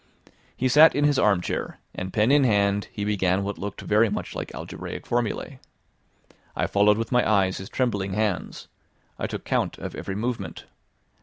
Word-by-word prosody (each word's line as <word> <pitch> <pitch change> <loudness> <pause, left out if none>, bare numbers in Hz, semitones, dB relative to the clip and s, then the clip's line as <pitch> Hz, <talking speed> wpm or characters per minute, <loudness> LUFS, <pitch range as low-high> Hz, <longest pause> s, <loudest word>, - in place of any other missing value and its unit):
He 130 - +1
sat 150 +5 +7
in 145 - +1
his 145 -2 +3
armchair, 100 -4 0 0.2
and 95 +1 -5
pen 110 +6 +2
in 145 -1 +5
hand 100 -3 +2
he 100 - -4
began 95 -2 +1
what 100 0 -4
looked 100 -1 -5
very 110 +2 +3
much 105 - -4
like - - -5
algebraic - - -7
formula: 120 -2 -2 1.0
I - - 0
followed 105 +1 +3
with 115 0 -3
my 125 -3 +3
eyes 95 -3 +2
his 95 - -8
trembling 100 -7 -1
hands, 105 -2 -2 0.5
I - - -1
took - - -6
count - - -1
of - - -6
every 95 - -5
movement. 110 -4 -4
105 Hz, 170 wpm, -25 LUFS, 100-120 Hz, 1.0 s, sat